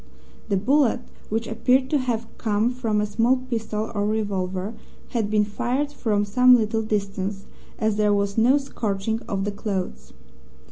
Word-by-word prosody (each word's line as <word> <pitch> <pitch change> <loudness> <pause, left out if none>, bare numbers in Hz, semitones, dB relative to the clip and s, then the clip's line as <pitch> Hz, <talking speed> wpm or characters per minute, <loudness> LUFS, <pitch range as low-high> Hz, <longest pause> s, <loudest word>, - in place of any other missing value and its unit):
The 200 - +2
bullet, 265 +5 +3 0.3
which 225 +2 -1
appeared 255 +4 +2
to 295 - +3
have 235 -3 -1
come 220 +1 +1
from 230 -4 -1
a 210 - +1
small 230 +5 +2
pistol 225 -4 -3
or 205 -2 0
revolver, 200 -2 -2 0.4
had 225 -4 -1
been 210 -1 +3
fired 250 +7 -1
from 215 -7 0
some 250 +5 +6
little 220 -1 +1
distance, 200 -2 -2 0.3
as 215 -1 0
there 210 -1 +3
was 200 0 +1
no 245 +5 +5
scorching 220 -5 -2
of 195 -2 -1
the 205 - -1
clothes. 190 - -4
215 Hz, 155 wpm, -24 LUFS, 205-240 Hz, 0.4 s, some